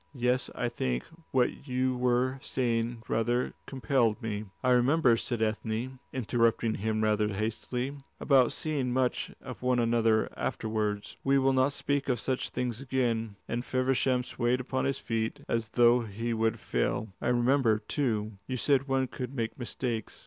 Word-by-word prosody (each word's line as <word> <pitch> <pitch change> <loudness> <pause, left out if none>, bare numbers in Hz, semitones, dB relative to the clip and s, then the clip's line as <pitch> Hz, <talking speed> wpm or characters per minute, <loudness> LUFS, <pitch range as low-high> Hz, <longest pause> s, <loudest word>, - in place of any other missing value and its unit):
"Yes, 125 0 +1
I - - -1
think 60 -1 -2 0.3
what 130 +2 0
you 130 0 +1
were 125 +1 +1
saying 115 -2 -1
rather 120 +3 0
compelled 130 -5 +1
me." 105 -1 -3 0.2
"I 130 - +3
remember," 125 +1 +4
said 115 0 -1
Ethne, 110 +4 -2
interrupting 115 -2 +1
him 110 +1 -1
rather 105 0 +2
hastily, 115 +6 -3 0.2
"about 130 -4 +4
seeing 140 -5 -1
much 130 -1 0
of 125 -2 -8
one 125 0 +2
another 115 -2 +3
afterwards. 105 -2 -2
We 135 0 +4
will 135 0 +3
not 130 +2 +3
speak 140 -1 -1
of 125 -3 +1
such 130 +1 -1
things 125 -1 -3
again," 120 -5 -1
and 120 +1 -2
Feversham 130 0 +1
swayed 120 +1 0
upon 130 +1 -2
his 135 0 0
feet 115 -1 -2
as 115 -1 -1
though 120 +1 +5
he 115 +2 -3
would 115 0 0
fall. 80 - -1
"I - - -1
remember, 120 -2 +3
too, 110 -5 -2
you 130 - -2
said 140 +2 +2
one 135 -1 +2
could 130 +1 -6
make 115 +3 -3
mistakes. 120 -2 -4
120 Hz, 155 wpm, -29 LUFS, 110-130 Hz, 0.3 s, though